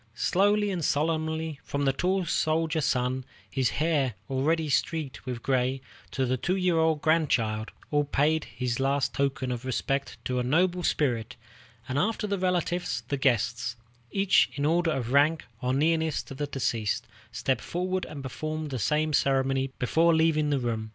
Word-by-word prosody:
Slowly 205 - +2
and 175 -4 -2
solemnly, 160 0 0
from 140 0 -2
the 135 - +3
tall 185 +5 0
soldier 160 0 +1
son, 130 -1 0 0.3
his 130 -3 +1
hair 145 -7 0 0.2
already 155 +4 +1
streaked 145 -2 -1
with 120 -2 -4
gray, 130 0 +1 0.3
to 135 - -1
the 130 +1 0
two 180 +9 0
year 180 -3 +2
old 160 -2 +2
grandchild, 115 -9 +1 0.2
all 145 -1 +2
paid 150 +2 +1
this 125 -1 -1
last 135 0 +1
token 135 -2 -1
of 125 0 -4
respect 135 +2 -2
to 125 0 0
a - - 0
noble 175 +7 +2
spirit; 125 -8 0 0.5
and 130 +2 -1
after 215 +4 0
the 200 -2 -1
relatives 180 -7 -1
the 145 - +1
guests, 120 -3 +1 0.3
each 195 -1 +3
in 145 - -2
the 150 - +3
order 170 0 +2
of 130 -6 -2
rank 150 +3 +3 0.2
or 125 0 0
nearness 160 +3 +1
to - - -10
the 145 +2 -3
deceased, 115 -6 -1 0.3
stepped 130 -3 -1
forward 185 +1 -2
and 140 -2 -8
performed 155 +3 -4
the 130 - -2
same 150 +7 +1
ceremony 135 -1 +2
before 165 +6 +3
leaving 160 -2 +3
the 145 - +2
room. 115 -3 -2
145 Hz, 170 wpm, -27 LUFS, 130-160 Hz, 0.5 s, the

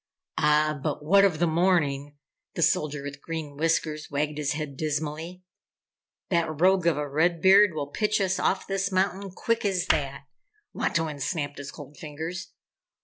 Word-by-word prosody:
"Ah 150 0 +3
but 150 0 -3
what 195 +5 +6
of 190 -6 +3
the 175 - +2
morning?" 155 -5 +1 0.4
The 170 - +1
Soldier 150 -2 +1
with 140 0 -7
Green 160 -3 -5
Whiskers 155 0 -1
wagged 150 +1 -2
his 150 0 0
head, 150 -2 -5
dismally. 155 +4 -3 0.9
"That 165 -4 0
rogue 185 0 +4
of 165 -4 +3
a 150 0 -2
Red 165 +4 +1
Beard 190 0 +6
will 145 -2 -2
pitch 210 +9 0
us 190 -1 0
off 190 - 0
this 195 0 -1
mountain 190 +1 0
quick 230 +5 -1
as 190 -4 0
that!" 140 -1 0 0.5
Wantowin 160 -3 -1
snapped 145 0 -3
his 140 0 -7
cold 145 0 -11
fingers. 160 +2 -6
155 Hz, 160 wpm, -26 LUFS, 150-185 Hz, 0.9 s, what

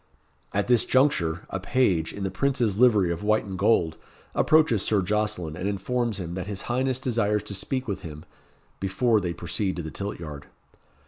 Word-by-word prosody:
At 100 0 0
this 120 -2 +5
juncture, 90 - +2
a 95 - -2
page, 95 -6 +1
in 100 - -6
the 95 - -2
Prince's 125 -2 0
livery 105 -6 +4
of 85 - -3
white 110 +1 +2
and 95 -1 -6
gold, 90 -5 +2 0.4
approaches 155 -10 +4
Sir 105 -3 +1
Jocelyn, 105 -5 -1
and 90 +3 -3
informs 110 +2 -1
him 85 -2 -5
that 90 0 -4
his 100 -2 -4
highness 130 +1 0
desires 110 -5 0
to 105 - -6
speak 130 +6 -2
with 100 - -2
him 75 0 -9 0.5
before 105 +3 +2
they 90 -2 -2
proceed 95 +3 -2
to 85 - -4
the 80 - -6
tilt 100 +1 -5
yard. 75 -3 -8
100 Hz, 185 wpm, -26 LUFS, 90-120 Hz, 0.5 s, this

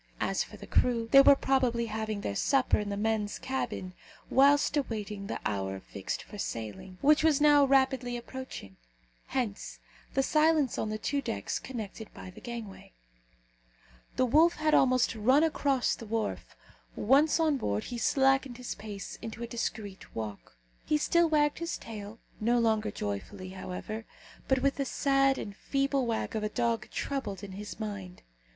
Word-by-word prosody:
As - - 0
for - - -12
the - - -10
crew, 235 -2 +1
they 275 - +10
were 280 - +8
probably 255 -4 +1
having 220 -1 -3
their 100 - -2
supper 265 - +2
in 210 -1 -3
the 200 - -3
men's 215 -1 0
cabin, 225 -8 -3 0.4
whilst 285 +2 +5
awaiting 210 -7 -3
the - - -3
hour 95 -2 -2
fixed 95 0 -5
for 210 - -11
sailing, 110 - -5
which 300 +2 +5
was 315 -3 +4
now 295 -1 +6
rapidly 265 -2 +2
approaching. 240 - -8 0.5
Hence 240 -6 -3 0.4
the 270 - +3
silence 305 -3 +3
on 220 - -1
the 215 - -2
two 280 +6 -1
decks 100 - -3
connected 220 -3 -7
by 185 - -9
the - - -14
gangway. 230 - -8 1.2
The 255 - +3
wolf 315 +7 +5
had 310 0 +1
almost 255 -2 +4
run 255 +7 +4
across 280 -5 +1
the 230 - -8
wharf; 225 0 -3 0.4
once 285 +8 +4
on 310 -3 +3
board, 105 - -1
he 240 - -5
slackened 270 -1 +2
his 250 -1 -5
pace 205 -2 -8
into 230 +1 -6
a - - -4
discreet 215 -4 -5
walk. 105 - -6 0.3
He 305 - +2
still 340 +2 +3
wagged 295 -1 +2
his 335 0 -3
tail 215 -1 -8 0.2
no 235 +3 +2
longer 220 -2 +2
joyfully, 185 - -5
however, 190 +4 -6 0.4
but 265 -1 +2
with 275 0 +2
the 275 - 0
sad 275 0 +2
and 200 - -6
feeble 275 +1 0
wag 225 0 -2
of 220 - -1
a 210 - -1
dog 230 -1 -1
troubled 215 -9 -4
in 200 - -7
his 205 +3 -8
mind. 200 -4 -6
235 Hz, 165 wpm, -30 LUFS, 205-275 Hz, 1.2 s, they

